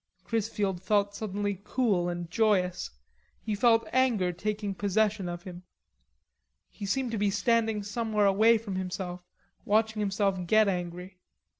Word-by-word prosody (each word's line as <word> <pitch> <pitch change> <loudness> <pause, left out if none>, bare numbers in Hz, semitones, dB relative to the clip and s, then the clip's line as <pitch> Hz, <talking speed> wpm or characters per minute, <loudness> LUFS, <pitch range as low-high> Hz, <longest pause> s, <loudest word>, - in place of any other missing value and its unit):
Chrisfield 205 -5 -2
felt 200 +1 +1
suddenly 205 -2 -3
cool 205 -8 +1
and 175 -1 -4
joyous. 200 -6 +1 0.5
He 215 - -4
felt 225 +2 +3
anger 235 -8 +2
taking 205 +3 -3
possession 205 -1 0
of 175 0 -6
him. 180 -2 -9 1.1
He 205 - -7
seemed 255 +3 -1
to 225 - -2
be 205 0 +2
standing 220 +1 +1
somewhere 210 0 0
away 220 +4 +5
from 205 -4 -5
himself 180 -1 -4 0.4
watching 220 +1 +1
himself 195 -2 0
get 215 +2 +5
angry. 180 0 -4
205 Hz, 135 wpm, -28 LUFS, 185-220 Hz, 1.1 s, away